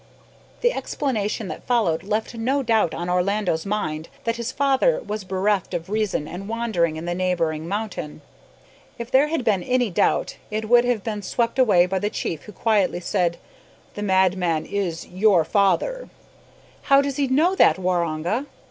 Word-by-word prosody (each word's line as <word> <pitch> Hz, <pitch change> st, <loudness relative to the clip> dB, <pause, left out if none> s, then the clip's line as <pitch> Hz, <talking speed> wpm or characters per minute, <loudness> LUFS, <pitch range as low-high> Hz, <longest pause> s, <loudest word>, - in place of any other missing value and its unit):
The 485 Hz, 0 st, +3 dB
explanation 220 Hz, -, -2 dB
that -, -, -8 dB
followed 220 Hz, -10 st, +2 dB
left 215 Hz, +4 st, -2 dB
no 260 Hz, +5 st, 0 dB
doubt 220 Hz, -7 st, +2 dB
on 175 Hz, -, -4 dB
Orlando's 180 Hz, -1 st, 0 dB
mind 160 Hz, -7 st, -3 dB
that 230 Hz, 0 st, -1 dB
his 235 Hz, +1 st, -3 dB
father 280 Hz, -, +2 dB
was 215 Hz, -, -5 dB
bereft 190 Hz, 0 st, 0 dB
of 175 Hz, +3 st, -5 dB
reason, 210 Hz, -8 st, -1 dB
and 195 Hz, +5 st, -7 dB
wandering 220 Hz, -9 st, 0 dB
in 160 Hz, +2 st, -6 dB
the 175 Hz, -, -1 dB
neighbouring 170 Hz, -3 st, -1 dB
mountain. 195 Hz, -7 st, -5 dB, 0.7 s
If 235 Hz, 0 st, -7 dB
there 275 Hz, +3 st, +5 dB
had 315 Hz, -4 st, -2 dB
been 210 Hz, -5 st, +2 dB
any 250 Hz, +1 st, 0 dB
doubt, -, -, +1 dB
it 215 Hz, +1 st, -3 dB
would 240 Hz, +1 st, +5 dB
have 240 Hz, -5 st, 0 dB
been 210 Hz, -2 st, -3 dB
swept 235 Hz, +5 st, -1 dB
away 200 Hz, -9 st, +5 dB
by 190 Hz, +1 st, -1 dB
the 205 Hz, -, -1 dB
chief, 160 Hz, -7 st, -4 dB
who 210 Hz, -, -10 dB
quietly 205 Hz, -3 st, +1 dB
said, 175 Hz, -1 st, 0 dB, 0.6 s
"the 205 Hz, -, -6 dB
madman 185 Hz, -5 st, +1 dB
is 185 Hz, -5 st, -3 dB
your 185 Hz, -3 st, +3 dB
father!" 215 Hz, -, +1 dB, 0.8 s
"How 275 Hz, 0 st, +6 dB
does 280 Hz, -1 st, -3 dB
he 280 Hz, -2 st, +1 dB
know 310 Hz, +8 st, +3 dB
that 380 Hz, -, +4 dB
Waroonga?" 180 Hz, -, -1 dB
205 Hz, 165 wpm, -23 LUFS, 180-235 Hz, 0.8 s, How